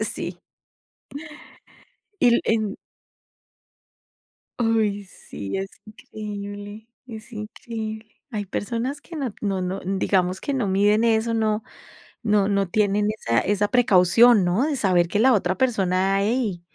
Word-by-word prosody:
sí. - - -5 1.8
Y 250 - +5
el - - +1
en 215 -2 0 1.9
Oy, 215 -3 +1
sí, 100 - -7
es 195 0 -3 0.2
increíble, 205 0 -8 0.2
es 230 +1 -10
increíble. 220 0 -7
Hay 210 -1 -2
personas 235 +8 -3
que 335 - -12
no 270 -8 -3
no 195 -3 -1
no, 185 +2 -3
digamos 190 -1 0
que 285 - -3
no 250 -6 0
miden 205 +4 +3
eso, 225 0 +2
no, 215 -1 0 0.6
no 210 -2 +2
no 200 -2 +1
tienen 205 +2 +1
esa 115 0 +1
esa 205 +1 0
precaución, 225 -1 +5
¿no? 185 +10 +1
De 300 - -1
saber 185 -8 +2
que 205 - -1
la 255 +4 +5
otra 185 -4 +1
persona: 195 -5 +1
"Hey, 210 -5 -1
210 Hz, 130 wpm, -23 LUFS, 195-225 Hz, 1.9 s, Y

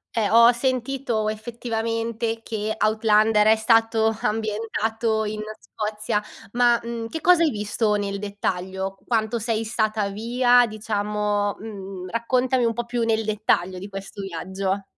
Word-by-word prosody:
Eh, 215 -3 +2
ho 230 +1 +7
ho 240 - +7
sentito 245 -3 -1
effettivamente 230 0 -3
che 215 -1 -3
Outlander 215 0 +3
è 220 - +7
stato 225 0 +3
ambientato 220 +1 -1
in 215 0 -4 0.2
Scozia. 210 0 -3 0.3
Ma, 240 -1 +4
mhmm, 230 -1 -4
che 320 +6 -6
cosa 350 -1 +5
hai 315 - +4
visto 210 0 -1
nel 200 -1 -2
dettaglio? 190 -1 -3
Quanto 225 0 0
sei 225 0 -1
stata 215 -2 0
via? 245 +3 +3
Diciamo, 210 -1 -1
mhmm, 195 -4 -8
raccontami 250 +2 +1
un 230 - +1
po' 240 - -3
più 240 0 -2
nel 225 -1 +1
dettaglio 200 -4 0
di 195 - -7
questo 195 0 -8
viaggio. 190 +2 -3
220 Hz, 140 wpm, -23 LUFS, 210-230 Hz, 0.3 s, ho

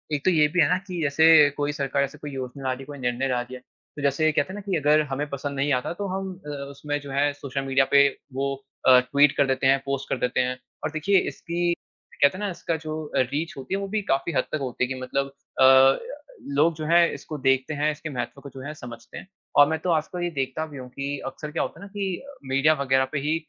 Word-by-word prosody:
एक 145 - -5
तो 185 - +5
ये 155 -3 +4
भी 175 +4 +2
है 145 - +5
ना 180 - +3
कि 180 -2 -4
जैसे 150 0 +6
कोई 145 0 0
सरकार 140 -1 0
ऐसे 140 +2 -5
कोई 150 -1 -7
योजना 130 0 -6
ला 130 - 0
रही 130 - -8
है, - - -9
कोई 145 0 -9
निर्णय 125 +1 -1
ला 125 -2 0
रही 125 +1 -8
है, - - -9
तो 145 - -15
जैसे 145 +3 +2
कहते 145 - +1
हैं - - -6
ना 205 - -6
कि 195 -2 -2
अगर 150 0 +4
हमें 145 +2 -2
पसंद 140 0 -4
नहीं 140 +2 0
आता, 125 +6 -1
तो 200 +3 -4
हम 190 0 -3
अ, - - -5 0.2
उसमें 145 +1 -4
जो 140 -1 -9
है, 145 +1 +2
सोशल 140 -1 -4
मीडिया 135 0 +3
पे 140 0 +7 0.3
वो 140 +1 -1 0.3
अ, 130 -1 +9
ट्वीट 140 +3 +3
कर 145 - +4
देते 130 0 +1
हैं, 135 +1 +5
पोस्ट 140 0 -3
कर - - 0
देते 125 +1 0
हैं, 125 0 0 0.3
और 155 - -2
देखिए, 155 +6 +2
इसकी 175 +1 -1 0.5
कहते 140 +6 +5
हैं 210 - -5
ना, 200 - -1
इसका 170 -1 -3
जो 155 0 -4
अ, - - +3
रीच 140 +6 -1
होती 130 +5 -6
है, 195 - +1
वो 195 - -3
भी 215 +2 -1
काफ़ी 135 +5 0
हद - - +2
तक - - 0
होती 125 -1 -2
है 125 - +2
कि 130 - -7
मतलब 135 +2 -2 0.3
अ, 130 0 +7 0.6
लोग 160 +3 +4
जो 155 0 -5
हैं, 170 +1 +5
इसको 155 -2 -7
देखते 135 +2 +1
हैं, 150 +1 +1
इसके 155 +1 -7
महत्व 125 0 -5
को 140 - -9
जो 130 0 -10
है 150 - -5
समझते 120 -5 -10
हैं - - -9 0.3
और 145 0 +8
मैं 160 - 0
तो 180 - -3
आजकल 165 +2 -1
ये 175 - 0
देखता 135 +2 -2
भी 145 -2 -10
हूँ 125 -1 -8
कि 140 +2 -4
अक्सर 150 +3 -6
क्या 165 - 0
होता - - -6
है - - -10
ना - - -9
कि 195 -3 -3 0.3
मीडिया 135 +4 +4
वग़ैरह 130 -1 +3
पे 145 - -1
ही 150 +3 0
145 Hz, 270 wpm, -25 LUFS, 135-155 Hz, 0.6 s, अ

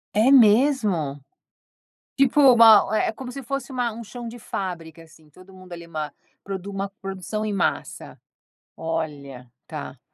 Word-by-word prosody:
É 225 +6 +4
mesmo? 210 - +3 0.9
Tipo 275 +1 +3
uma 225 -2 +7
é - - 0
como 250 +2 -8
se 275 - -7
fosse 275 +3 -5
uma 245 -3 -2
um 230 +2 -8
chão 240 +2 -9
de 235 +1 -8
fábrica 170 -6 -6
assim 155 -1 -21
todo 185 +5 -17
mundo 185 -1 -14
ali 170 -1 -9
uma 155 -2 -5 0.3
produ 195 0 -6
uma 195 0 -4
produção 195 +2 -5
em 210 - -2
massa. 195 -3 -3 0.6
Olha, 145 -6 -5 0.2
tá. - - -8
195 Hz, 150 wpm, -23 LUFS, 165-235 Hz, 0.9 s, uma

